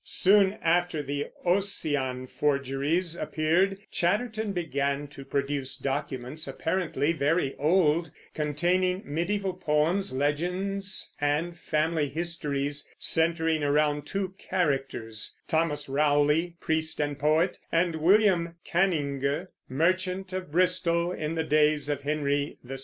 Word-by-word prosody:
Soon 195 0 +4
after 170 -2 +1
the 140 +1 -3 0.2
"Ossian" 150 -9 0
forgeries 145 +5 0
appeared, 170 +5 +1
Chatterton 215 +4 0
began 140 -5 -1
to 140 -1 -10
produce 140 0 -2
documents, 135 +2 -3
apparently 165 -2 -1
very 150 -1 +1
old, 165 +1 +3 0.2
containing 180 +5 0
mediæval 185 +5 -2
poems, 160 +6 +1
legends, 180 +9 -1
and 150 +4 0
family 155 -2 0
histories, 145 -3 -2
centering 160 -1 +1
around 145 0 +1
two 190 +1 -3
characters, 135 - -2
Thomas 155 -3 0
Rowley, 150 +4 +2
priest 160 0 -1
and 145 -1 -1
poet, 155 +5 +2
and 165 -1 +1
William 175 -1 +3
Canynge, 155 -3 0 0.2
merchant 185 +5 0
of 185 -4 -4
Bristol 175 0 +2
in 155 -2 -3
the 160 - 0
days 150 -1 +2
of 145 - -1
Henry 145 0 -1
VI. 135 +2 -6
160 Hz, 110 wpm, -27 LUFS, 145-180 Hz, 0.2 s, Soon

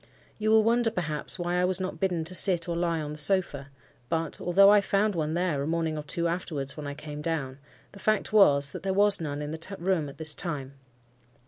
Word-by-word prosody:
You 215 0 0
will 220 0 +5
wonder, 235 +1 +2
perhaps, 160 -9 -2
why 175 0 -1
I - - +2
was 185 0 +4
not 185 -3 -5
bidden 180 -3 -1
to 165 +3 -5
sit 180 -2 +2
or 170 - -2
lie 170 -1 -1
on 150 -1 -5
the 150 - -7
sofa; 150 -6 0 0.4
but 165 -1 -2
(although 195 +3 +5
I 205 -1 +5
found 200 +2 0
one 155 -2 -2
there 175 -5 -1
a 140 - -3
morning 165 -1 -1
or 150 - -4
two 170 +3 -1
afterwards, 160 -5 -3
when 150 -2 -7
I 140 - -6
came 150 0 -8
down) 145 -4 -3 0.3
the 200 - -14
fact 215 +1 0
was, 140 -9 +4
that 180 - -8
there 190 +1 -2
was 205 -1 +5
none 145 -2 -4
in 150 - -5
the 165 +5 -5
room 170 -4 -1
at 140 - -13
this 155 -1 +2
time. 140 -6 -5
170 Hz, 230 wpm, -27 LUFS, 150-190 Hz, 0.4 s, will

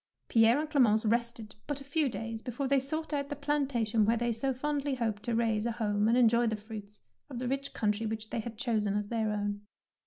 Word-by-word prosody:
Pierre 230 +2 +5
and 305 +1 -1
Clemence 235 -8 +3
rested 235 -1 -1
but 290 -1 -2
a - - -9
few 285 +1 +1
days 225 -1 -5
before 250 +3 -3
they 275 0 +4
sought 310 +4 -2
out 280 -1 -1
the 290 - -3
plantation 270 -7 +1
where 225 +3 +3
they 240 +1 0
so 250 +4 -1
fondly 285 +1 -1
hoped 225 -4 -2
to 235 +1 -2
raise 225 -1 +1
a 235 - -1
home 210 -2 +1
and 235 +2 +4
enjoy 235 -1 +4
the 220 - 0
fruits 210 -1 -9 0.3
of 260 - -6
the 250 +1 -3
rich 275 +2 -2
country 215 +1 0
which 220 0 -4
they - - -1
had 225 0 -6
chosen 215 -5 0
as 205 0 -3
their 220 -2 0
own. 205 -1 -2
235 Hz, 225 wpm, -31 LUFS, 215-270 Hz, 0.3 s, Pierre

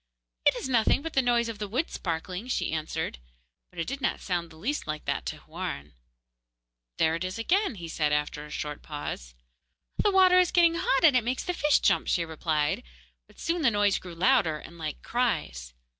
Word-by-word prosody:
'It - - +6
is - - -4
nothing 245 +2 +3
but 325 - -5
the 270 - +4
noise 240 -2 +2
of 225 -3 -6
the 210 - -3
wood 255 +11 -1
sparkling,' 180 +5 -4
she 255 - -1
answered; 160 - -3 0.5
but 180 - -22
it 165 - -1
did 275 +2 -5
not - - 0
sound 175 -3 -2
the 160 - -15
least 245 - -3
like 155 0 -4
that - - -2
to - - -4
Houarn. 75 +1 -6 1.0
'There 160 0 +3
it 165 +2 -2
is 185 +2 -4
again,' 365 - +1
he 170 -4 -7
said, 155 -2 0
after 150 0 -1
a 150 - -11
short 150 0 -5
pause. - - -6 0.7
'The 415 - +3
water 375 -2 +6
is 360 -1 +4
getting 340 -2 +5
hot, 305 -4 +1
and 305 -5 +7
it 250 - +4
makes 250 +3 -1
the 360 - -2
fish 295 -4 +3
jump,' - - +2
she 170 - +1
replied; 155 -2 -1 0.5
but - - -22
soon 335 +1 -1
the 270 - +5
noise 205 -2 +2
grew 180 -2 -10
louder 180 -4 +3
and 170 +3 -12
like 155 -2 -5
cries. 60 - -1
190 Hz, 205 wpm, -28 LUFS, 160-265 Hz, 1.0 s, and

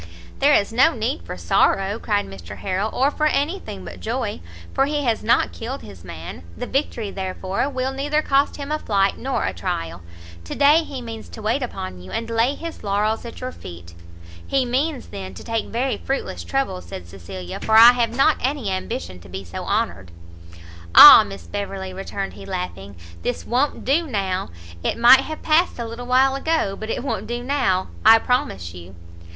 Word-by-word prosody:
"There 285 +2 +5
is 200 +2 +1
no 265 +7 +4
need 240 +7 -2
for - - -6
sorrow," 195 +3 +1
cried 205 -3 0
Mr 95 -3 -10
Harrel, 195 +2 -2
"or 275 +3 +2
for 305 +1 +1
any 305 +6 0
thing 95 - -9
but 90 0 -9
joy, 85 -2 -3 0.3
for 270 - +2
he 295 0 -1
has 230 -4 0
not 230 - +2
killed 250 +4 -6
his 95 -4 -12
man; 85 -1 -8 0.2
the - - -4
victory, 240 -6 -2
therefore, 190 +5 -3
will 260 -1 -2
neither 295 +3 0
cost 275 +1 +2
him 285 0 -6
a 305 - 0
flight 200 -5 +1
nor 270 +1 -1
a 95 - -2
trial. 85 0 -4 0.4
To - - -6
day 295 +4 +5
he 270 -5 -7
means 225 -1 -8
to 220 - -10
wait 225 +6 0
upon 95 - -6
you, 90 - -12
and 230 - -4
lay 230 +5 +2
his 335 -1 -8
laurels 210 +3 0
at 235 - -9
your 255 0 -4
feet." 85 - -11 0.5
"He 270 -2 +1
means, 265 +3 -1
then, 190 -2 -7
to - - -10
take 225 -1 -2
very 255 +3 -1
fruitless 270 - -4
trouble," 265 -10 -2
said 90 -2 -9
Cecilia, 90 0 -8
"for 220 0 +3
I 230 +2 +11
have 240 -2 0
not 270 +6 +3
any 260 -6 -1
ambition 90 - -4
to 85 0 -15
be 95 +2 -6
so 85 - -7
honoured." 90 -3 -1 0.9
"Ah, - - +12
Miss 100 -3 -9
Beverley," 190 - -5
returned 195 +1 -5
he, - - -11
laughing, 180 - -5 0.3
"this 245 - -3
won't 260 +5 0
do 315 +5 +2
now! 195 -6 -2 0.3
it - - -1
might 240 +3 +8
have 310 +3 -7
passed 325 +3 +2
a 235 - -4
little 230 +2 -7
while 260 +2 +4
ago, 275 -8 0
but 220 +2 -7
it 240 - -2
won't 215 -6 -3
do 240 +1 -4
now, 200 -9 0
I 225 +1 +9
promise 95 - -1
you!" 90 +1 -11
225 Hz, 195 wpm, -22 LUFS, 185-270 Hz, 0.9 s, Ah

